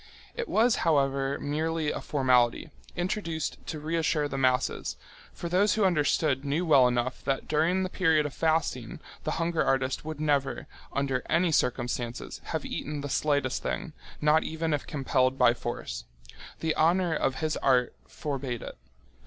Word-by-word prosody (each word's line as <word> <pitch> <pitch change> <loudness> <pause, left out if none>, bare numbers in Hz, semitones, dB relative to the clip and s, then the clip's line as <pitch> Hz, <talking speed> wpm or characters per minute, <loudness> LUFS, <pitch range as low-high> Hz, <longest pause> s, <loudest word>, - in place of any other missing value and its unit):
It 475 -1 -4
was, 230 +1 +3
however, 140 -3 +1
merely 155 +2 -1
a - - -4
formality, 130 0 +2 0.2
introduced 175 -3 -2
to 155 - -4
reassure 155 -1 0
the 140 - -6
masses, 130 -2 0 0.3
for 170 - -6
those 185 +5 +3
who 215 -2 +2
understood 150 -5 +2
knew 145 +5 0
well 140 -6 +6
enough 125 +1 -1
that 135 -1 -1
during 165 +5 +2
the - - 0
period 160 -5 +2
of 145 - -4
fasting 160 -3 0 0.3
the 155 - 0
hunger 165 0 +1
artist 135 0 0
would 155 -1 -6
never, 145 -3 0 0.3
under 135 -2 0
any 170 +1 +3
circumstances, 120 -3 -1
have - - -3
eaten 150 0 -4
the 145 - -5
slightest 140 -2 0
thing, 160 - -3 0.3
not 150 +1 +4
even 160 0 -2
if 145 - -2
compelled 135 -2 +1
by 125 -2 +5
force. - - -5 0.6
The 160 -1 0
honour 170 +1 +3
of 135 -3 0
his 155 0 -1
art 125 -3 +2
forbade 135 -5 -4
it. - - -9
150 Hz, 155 wpm, -28 LUFS, 135-160 Hz, 0.6 s, well